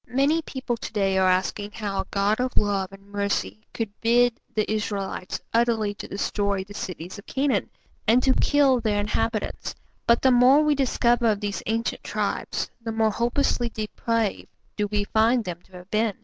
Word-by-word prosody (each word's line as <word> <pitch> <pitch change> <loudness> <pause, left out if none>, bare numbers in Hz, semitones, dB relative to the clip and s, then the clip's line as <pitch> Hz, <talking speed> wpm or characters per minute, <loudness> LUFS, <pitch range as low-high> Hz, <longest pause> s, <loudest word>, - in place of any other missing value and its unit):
Many 280 +6 +2
people 260 -5 -4
to - - -7
day 195 -2 +2
are 185 0 +4
asking 205 +3 0
how 205 -3 -3
a 190 - -9
God 205 +2 +1
of 255 0 -2
love 200 -2 +1
and 195 +1 -15
mercy 200 - -1
could 225 -3 -3
bid 240 +1 +4 0.2
the 215 -1 0
Israelites 200 -3 -3
utterly 225 -3 +2
to 200 - -8
destroy 200 -1 -1
the 200 +2 -12
cities 180 0 -6
of 200 - -14
Canaan, 265 -6 0 0.4
and 240 +3 +5
to 265 - +4
kill 275 -3 +3
their 215 -3 0
inhabitants, 215 +1 -2 0.3
but 235 0 +4
the 260 - +6
more 255 +4 +6
we 300 -1 +3
discover 240 -3 +2
of 210 -2 +2
these 205 -1 -3
ancient 225 +1 -1
tribes, - - -2
the 225 -1 -4
more 220 -1 +2
hopelessly 240 +1 0
depraved 220 0 -2 0.3
do 210 -1 0
we 205 0 0
find 225 +3 +2
them 175 -1 -5
to 190 - -26
have 180 +1 -12
been. 215 -1 +1
215 Hz, 180 wpm, -25 LUFS, 200-240 Hz, 0.4 s, the